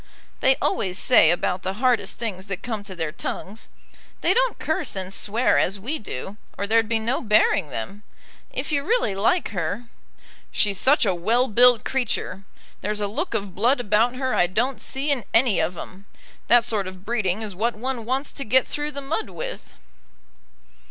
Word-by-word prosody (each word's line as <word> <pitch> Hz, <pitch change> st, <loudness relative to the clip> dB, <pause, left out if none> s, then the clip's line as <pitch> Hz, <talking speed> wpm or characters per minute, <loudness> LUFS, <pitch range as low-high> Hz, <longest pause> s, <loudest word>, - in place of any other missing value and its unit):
"They 265 Hz, 0 st, +4 dB
always 185 Hz, -6 st, -1 dB
say 225 Hz, -10 st, +5 dB
about 180 Hz, +1 st, 0 dB
the 190 Hz, -, -3 dB
hardest 235 Hz, -4 st, +1 dB
things 200 Hz, -4 st, -5 dB
that 195 Hz, -1 st, -4 dB
come 220 Hz, -4 st, -4 dB
to 190 Hz, -2 st, -8 dB
their 160 Hz, -3 st, -3 dB
tongues. 200 Hz, +6 st, -6 dB, 0.5 s
They -, -, +3 dB
don't -, -, +2 dB
curse 315 Hz, -, -2 dB
and 190 Hz, 0 st, -4 dB
swear 220 Hz, +5 st, +1 dB
as 195 Hz, +2 st, 0 dB
we 280 Hz, +10 st, -3 dB
do, 195 Hz, -, -7 dB, 0.2 s
or 200 Hz, -, -1 dB
there'd 225 Hz, +1 st, +2 dB
be 230 Hz, -, +2 dB
no 230 Hz, +4 st, -1 dB
bearing 210 Hz, -, +3 dB
them. 170 Hz, -, -6 dB, 0.5 s
If -, -, -4 dB
you 285 Hz, -2 st, +1 dB
really 450 Hz, -, +1 dB
like 225 Hz, -, +1 dB
her 190 Hz, +4 st, -3 dB, 0.4 s
" -, -, -29 dB, 0.3 s
"She's 200 Hz, -3 st, +1 dB
such 285 Hz, 0 st, +4 dB
a 195 Hz, -, +2 dB
well 225 Hz, +9 st, +1 dB
built 245 Hz, +1 st, +5 dB
creature! 220 Hz, -6 st, -2 dB, 0.4 s
There's 210 Hz, +1 st, -2 dB
a 205 Hz, -, 0 dB
look 205 Hz, +3 st, -3 dB
of 200 Hz, -3 st, -3 dB
blood 245 Hz, +8 st, +2 dB
about 230 Hz, +2 st, +2 dB
her 260 Hz, 0 st, -1 dB
I 175 Hz, -, +3 dB
don't 240 Hz, +8 st, -1 dB
see 275 Hz, +2 st, -1 dB
in 260 Hz, -5 st, 0 dB
any 230 Hz, -4 st, +4 dB
of 165 Hz, +2 st, -1 dB
'em. 195 Hz, +4 st, -10 dB, 0.4 s
That 240 Hz, -1 st, +6 dB
sort 210 Hz, -5 st, -1 dB
of 185 Hz, +1 st, -10 dB
breeding 215 Hz, -3 st, -1 dB
is 210 Hz, -2 st, -5 dB
what 225 Hz, +5 st, -1 dB
one 250 Hz, +1 st, -3 dB
wants 260 Hz, +5 st, -2 dB
to 275 Hz, -, -6 dB
get 255 Hz, +3 st, +3 dB
through 295 Hz, 0 st, -4 dB
the 280 Hz, -, -5 dB
mud 275 Hz, -5 st, -3 dB
with." 170 Hz, -4 st, -7 dB
220 Hz, 190 wpm, -23 LUFS, 195-255 Hz, 0.5 s, That